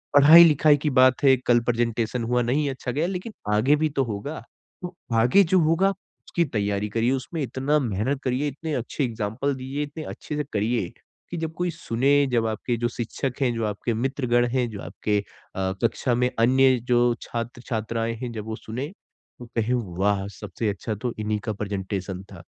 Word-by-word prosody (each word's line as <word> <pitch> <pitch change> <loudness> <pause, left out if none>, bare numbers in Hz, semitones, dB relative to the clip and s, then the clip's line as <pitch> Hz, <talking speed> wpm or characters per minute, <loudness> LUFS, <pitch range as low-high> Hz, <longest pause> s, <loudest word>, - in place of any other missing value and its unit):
पढ़ाई-लिखाई 150 0 +8
की 150 +1 -1
बात 130 0 +4
है 135 -1 +7
कल 120 -1 +5
प्रेजेंटेशन 115 0 0
हुआ 125 +1 +1
नहीं 140 +5 +1
अच्छा 130 -1 -4
गया 150 +6 0
लेकिन 190 +4 -5 0.2
आगे 125 +8 +4
भी 155 +1 +1
तो 135 - +4
होगा। 115 +6 -5 0.4
तो 180 -1 -6 0.2
आगे 125 - +5
जो 185 +1 +3
होगा 165 +4 +3
उसकी 185 -2 -4
तैयारी 105 -1 -1
करिए। 115 +4 +1
उसमें 135 +5 -3
इतना 135 +2 0
मेहनत 130 +3 -1
करिए 130 +3 0
इतने 150 +3 -4
अच्छे 125 +4 -2
एक्जाम्पल 115 +3 -2
दीजिए। 135 +3 -4
इतने 150 +2 -7
अच्छे 150 - -6
से 150 - 0
करिए 110 -2 0 0.4
कि 175 - -3
जब 160 0 -3
कोई 180 0 0
सुने 140 -3 +1 0.2
जब 115 -2 +2
आपके 110 +2 -2
जो 120 +1 0
शिक्षक 125 +3 -3
हैं 125 -3 +2
जो 115 -1 -1
आपके 105 +3 -2
मित्रगण 120 0 +1
हैं। 125 -2 +1
जो 105 -3 -7
आपके 105 -1 -2 0.4
अ, 95 0 -1
कक्षा 120 +1 +1
में 125 +1 +2
अन्य 130 +2 +5
जो 120 0 +4
छात्र-छात्राएँ 115 -1 -3
हैं 125 - -4
जब 110 -2 -6
वो 110 0 -4
सुने 125 +6 -5 0.5
तो 120 - -8
कहें 115 +2 +1 0.3
वाह 100 0 +1
सबसे 105 +2 -3
अच्छा 105 +2 -3
तो 120 +3 -3
इन्हीं 105 0 -1
का 110 - -1
प्रेजेंटेशन 95 -2 -4
था। - - -11
125 Hz, 185 wpm, -24 LUFS, 110-145 Hz, 0.5 s, पढ़ाई-लिखाई